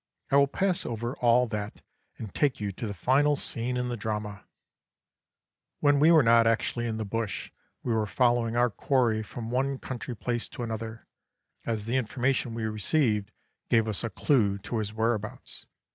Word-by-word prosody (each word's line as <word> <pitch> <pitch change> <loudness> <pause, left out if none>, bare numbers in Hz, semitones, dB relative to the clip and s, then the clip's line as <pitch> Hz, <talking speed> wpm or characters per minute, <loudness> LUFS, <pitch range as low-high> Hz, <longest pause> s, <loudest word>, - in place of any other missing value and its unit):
I - - +4
will 140 0 +6
pass 185 +5 0
over 120 +2 -4
all 120 +1 +4
that 105 -1 -5 0.3
and 110 -4 -7
take 145 -3 +1
you 105 -2 -2
to 110 +4 -5
the 100 - -4
final 140 - +3
scene 125 -2 0
in 125 0 -1
the 120 - -2
drama. 105 -2 -4 1.3
"When 145 -1 +4
we 155 +3 +6
were 160 -4 +7
not 115 0 +5
actually 120 +1 0
in 110 -1 -2
the 110 - -3
bush 110 -1 -3 0.3
we 120 - 0
were 110 -1 +1
following 120 0 +2
our 120 0 +3
quarry 115 0 +1
from 115 +1 -7
one 135 +2 0
country 125 -2 -6
place 120 +2 -2
to 120 - -7
another, 115 0 -5 0.6
as 110 -3 -1
the 120 +3 0
information 125 0 0
we 115 - -3
received 110 -1 +1 0.4
gave 115 -2 +3
us 110 0 -2
a 115 - -1
clue 105 -3 +2
to 115 - -2
his 105 -1 -3
whereabouts. 110 -1 -2
115 Hz, 175 wpm, -28 LUFS, 110-125 Hz, 1.3 s, were